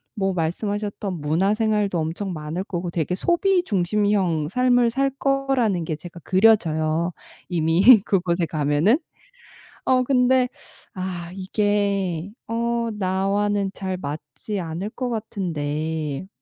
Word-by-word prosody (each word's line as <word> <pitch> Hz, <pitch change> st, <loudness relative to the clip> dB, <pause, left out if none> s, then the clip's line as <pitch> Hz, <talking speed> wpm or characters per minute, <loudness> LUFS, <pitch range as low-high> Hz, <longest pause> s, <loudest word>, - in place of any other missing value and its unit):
뭐 195 Hz, -3 st, 0 dB
말씀하셨던 200 Hz, +1 st, -2 dB
문화생활도 200 Hz, +5 st, +1 dB
엄청 170 Hz, +4 st, -3 dB
많을 155 Hz, +3 st, -4 dB
거고 175 Hz, -3 st, -4 dB
되게 170 Hz, +1 st, -1 dB
소비 355 Hz, -, +2 dB
중심형 190 Hz, -, +1 dB
삶을 245 Hz, +1 st, +3 dB
살 275 Hz, +2 st, +1 dB
거라는 270 Hz, -, +1 dB
게 155 Hz, -, -2 dB
제가 170 Hz, +2 st, -11 dB
그려져요 170 Hz, -5 st, +3 dB, 0.4 s
이미 175 Hz, +7 st, +6 dB
그곳에 175 Hz, -3 st, +1 dB
가면은. 155 Hz, -, +2 dB, 0.9 s
어 255 Hz, -1 st, +3 dB
근데 250 Hz, -1 st, +3 dB, 0.4 s
아 180 Hz, -3 st, -5 dB
이게 195 Hz, -2 st, 0 dB, 0.2 s
어 235 Hz, 0 st, -1 dB
나와는 200 Hz, +1 st, 0 dB
잘 190 Hz, -2 st, -4 dB
맞지 170 Hz, +6 st, -5 dB
않을 170 Hz, +4 st, -4 dB
것 255 Hz, -2 st, -3 dB
같은데 160 Hz, -7 st, -3 dB
190 Hz, 235 characters per minute, -23 LUFS, 170-220 Hz, 0.9 s, 이미